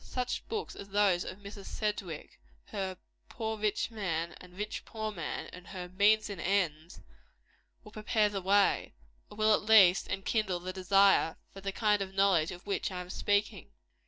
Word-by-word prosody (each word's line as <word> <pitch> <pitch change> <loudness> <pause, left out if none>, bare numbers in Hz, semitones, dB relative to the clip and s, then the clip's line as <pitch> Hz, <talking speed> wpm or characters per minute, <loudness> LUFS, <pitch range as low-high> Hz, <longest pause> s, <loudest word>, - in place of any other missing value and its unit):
Such 250 -1 -4
books 440 -1 -4
as 200 - -9
those 195 -3 +3
of 185 - -7
Miss 200 -1 -10
Sedgwick 205 -7 -4 0.3
her 190 -3 -3 0.3
"Poor 220 -2 -3
Rich 215 +2 0
Man, 170 -6 -2
and 180 0 -14
Rich 210 +1 -4
Poor 220 -1 -4
Man," - - -5
and 180 -1 -11
her 180 -2 -7
"Means 205 +4 +3
and 200 -4 -6
Ends" 170 -4 -1 0.8
will 210 - -13
prepare 215 0 +1
the 200 -2 -3
way, 200 +2 +2 0.3
or 210 - -13
will 215 0 +4
at - - +2
least 205 -4 +6
enkindle 195 -2 -1
the 185 +1 -5
desire, 195 -2 +4 0.2
for 195 - -10
the 195 0 -3
kind 210 0 +2
of 190 0 -5
knowledge 195 -5 +3
of 180 -1 -9
which 200 - -1
I 180 - -4
am 180 0 -7
speaking. 205 +1 -1
200 Hz, 175 wpm, -31 LUFS, 185-210 Hz, 0.8 s, least